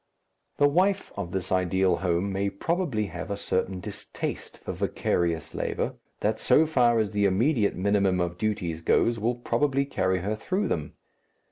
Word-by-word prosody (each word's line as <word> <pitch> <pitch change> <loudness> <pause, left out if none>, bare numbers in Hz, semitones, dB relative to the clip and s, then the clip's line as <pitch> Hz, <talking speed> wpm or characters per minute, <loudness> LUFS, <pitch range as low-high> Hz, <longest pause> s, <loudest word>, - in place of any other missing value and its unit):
The 145 - +5
wife 190 +6 +1
of 85 - -4
this 95 -1 -3
ideal 95 0 +2
home 90 +2 0
may 100 +1 0
probably 115 - -1
have 90 0 -6
a 100 - -2
certain 95 -1 -1
distaste - - -6
for - - -6
vicarious 85 -2 -1
labour, - - -2 0.3
that 110 +1 0
so 145 +5 +4
far 125 -6 +3
as 110 -2 +1
the 105 -1 +1
immediate 110 +3 +2
minimum 100 -1 +2
of 90 0 -2
duties 90 -6 -2
goes 115 +7 +2
will 120 +3 0
probably 135 +3 +1
carry 95 -9 0
her 105 +4 -1
through 190 - -1
them. 75 -3 -2
100 Hz, 160 wpm, -27 LUFS, 95-120 Hz, 0.3 s, The